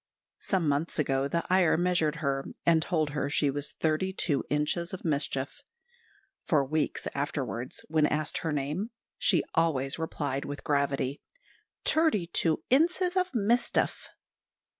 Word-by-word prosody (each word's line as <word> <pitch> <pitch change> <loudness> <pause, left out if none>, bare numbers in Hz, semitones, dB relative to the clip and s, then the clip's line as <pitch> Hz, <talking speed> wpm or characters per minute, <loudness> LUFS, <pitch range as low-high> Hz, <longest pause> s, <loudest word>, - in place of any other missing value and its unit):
Some 185 -5 0
months 145 +4 0
ago, 135 -2 +1
the 170 +4 -1
Iyer 185 -3 +4
measured 175 -3 +1
her, 135 0 0 0.2
and 165 -1 +5
told 155 -3 0
her 145 -1 -1
she 145 -1 +2
was 145 +1 -3
thirty 160 +4 0
two 155 -7 +1
inches 160 +5 0
of 180 - -12
mischief. 140 - -1 0.9
For 150 -7 +3
weeks 155 +2 -1
afterwards, 135 -3 -3
when 155 -1 +3
asked 155 +1 -1
her 160 - -2
name, 150 +9 -2 0.3
she 175 -6 +3
always 145 -4 +1
replied 145 -4 -2
with 145 0 -6
gravity, 140 -1 0 0.6
"Terty 315 - +3
two 160 -2 +1
inses 355 +6 +3
of 370 0 +1
mistef." 235 +1 +1
155 Hz, 140 wpm, -29 LUFS, 140-180 Hz, 0.9 s, and